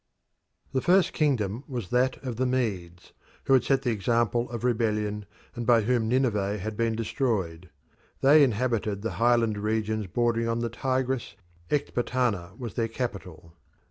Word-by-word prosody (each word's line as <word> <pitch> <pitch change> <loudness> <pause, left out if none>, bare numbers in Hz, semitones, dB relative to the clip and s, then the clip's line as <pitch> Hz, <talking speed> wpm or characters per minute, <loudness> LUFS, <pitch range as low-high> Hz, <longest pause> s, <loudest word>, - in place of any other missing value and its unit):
The 130 - +1
first 185 +4 +3
kingdom 125 - 0
was 120 - -5
that 125 +1 +2
of 120 -3 -4
the 130 +1 +1
Medes, 95 -9 -3 0.3
who 135 - +2
had 130 - +5
set 135 -1 +1
the 125 - +1
example 120 +3 0
of 120 -1 -6
rebellion, 105 -4 0 0.3
and 120 - -4
by 120 -2 +5
whom 120 0 +1
Nineveh 105 -6 +1
had 105 +2 -5
been 115 0 0
destroyed. 105 - -2 0.5
They 145 +2 +7
inhabited 110 -4 0
the 115 - -2
highland 115 -3 +3
regions 110 0 -1
bordering 115 +3 0
on 115 0 0
the 115 0 -1
Tigris, 130 -1 -2 0.3
Ecbatana 120 -9 -1
was 120 -5 -6
their 115 -1 0
capital. 95 -9 -6
115 Hz, 150 wpm, -27 LUFS, 105-125 Hz, 0.5 s, They